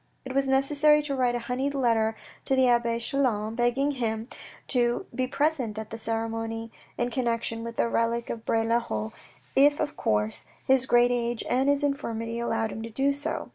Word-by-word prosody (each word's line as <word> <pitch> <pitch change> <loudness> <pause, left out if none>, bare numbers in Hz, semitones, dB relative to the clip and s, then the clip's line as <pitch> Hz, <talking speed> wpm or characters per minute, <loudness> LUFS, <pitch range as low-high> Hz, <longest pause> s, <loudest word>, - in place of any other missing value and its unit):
It 260 - -5
was 275 0 +1
necessary 290 +3 +4
to 285 -2 -2
write 250 -2 +1
a 235 -1 -4
honeyed 265 +3 -1
letter 225 -4 +2 0.3
to 270 - +2
the 260 -1 +4
abbe 235 -1 +2
Chelan, 230 -4 0
begging 245 +5 +1
him 230 -3 -3 0.4
to 240 +7 +1
be 255 -1 -1
present 275 -5 0
at 220 0 -6
the 225 - -5
ceremony 225 0 -3 0.3
in 240 0 -1
connection 230 -2 -1
with 230 0 -6
the - - +1
relic 230 0 0
of 225 - -6
Bray 225 0 +1
le 230 +1 +3
Haut, 110 - -4 0.4
if 290 +2 +5
of 295 -1 -2
course, 105 +1 0 0.2
his 260 -1 +3
great 240 -1 +5
age 240 -1 -1
and 260 +3 +2
his 285 0 +2
infirmity 230 -5 -2
allowed 225 -2 -1
him 220 - -6
to 230 - -6
do 270 +5 +1
so. 290 +3 -2
240 Hz, 190 wpm, -27 LUFS, 225-270 Hz, 0.4 s, if